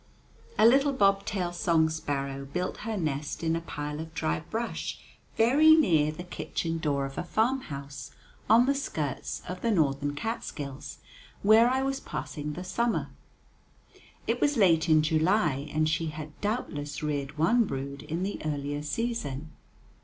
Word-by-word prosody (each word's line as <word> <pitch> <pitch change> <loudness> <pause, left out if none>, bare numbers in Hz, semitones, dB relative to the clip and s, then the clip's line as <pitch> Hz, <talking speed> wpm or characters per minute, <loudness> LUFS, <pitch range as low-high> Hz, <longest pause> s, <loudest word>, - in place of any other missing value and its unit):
A - - +6
little 275 +4 +5
bob 195 -5 +3
tailed 180 -4 -2
song 165 -2 +3
sparrow 140 -3 -3
built 180 +7 -3
her 220 -1 -4
nest 150 -2 -3
in 165 0 +1
a 165 - -2
pile 150 -2 -5
of 160 0 -8
dry 80 - 0
brush 230 - -4 0.4
very 290 +8 +7
near 160 - +3
the 155 +3 -7
kitchen 165 -2 -3
door 140 -3 0
of 135 0 -6
a - - -2
farmhouse 145 - -2 0.4
on 230 +3 +7
the 280 - +3
skirts 155 - -3
of 180 0 -5
the 235 - +1
northern 145 -6 +1
Catskills, 145 - -5 0.5
where 220 +4 +7
I 260 +1 +1
was 270 0 -1
passing 150 0 -5
the 180 - -6
summer. 235 +5 -1 1.1
It - - -1
was 290 -2 +2
late 170 -5 +4
in 155 -1 +5
July, 155 -3 +2
and 155 0 +2
she 165 +1 0
had 155 0 -6
doubtless 165 - -3
reared 145 -1 -2
one 225 +10 +4
brood 140 -2 -5
in 165 +4 -3
the 200 +1 -3
earlier 145 -1 -2
season. 155 - -3
160 Hz, 155 wpm, -28 LUFS, 145-220 Hz, 1.1 s, very